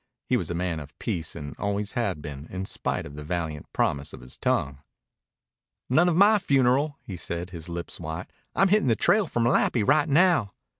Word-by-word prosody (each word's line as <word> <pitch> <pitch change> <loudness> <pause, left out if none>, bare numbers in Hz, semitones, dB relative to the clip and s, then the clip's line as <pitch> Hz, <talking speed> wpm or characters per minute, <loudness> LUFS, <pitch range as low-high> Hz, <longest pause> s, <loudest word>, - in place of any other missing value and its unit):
He - - +1
was - - -1
a 85 - -2
man 85 -2 -1
of 75 0 -11
peace 85 -9 -3
and 70 -1 -7
always 100 0 -1
had 100 - -1
been, 70 0 -7
in 95 +1 -4
spite - - -2
of 70 - -9
the 75 +1 -7
valiant 80 -2 -4
promise 70 0 0
of - - -10
his 65 +1 -8
tongue. 70 0 0 1.1
"None 175 +7 +5
of 170 - +1
my 205 +4 +6
funeral," 140 -2 +2
he 95 - -7
said, 85 +1 -4
his 85 -1 -7
lips 85 0 -5
white. 80 +1 -6 0.2
"I'm 195 +1 +4
hittin' 210 -6 +3
the 115 - +4
trail 205 - +3
for 120 - -1
Malapi 120 -1 +3
right 150 +2 +4
now." 155 - +4
95 Hz, 200 wpm, -26 LUFS, -, 1.1 s, my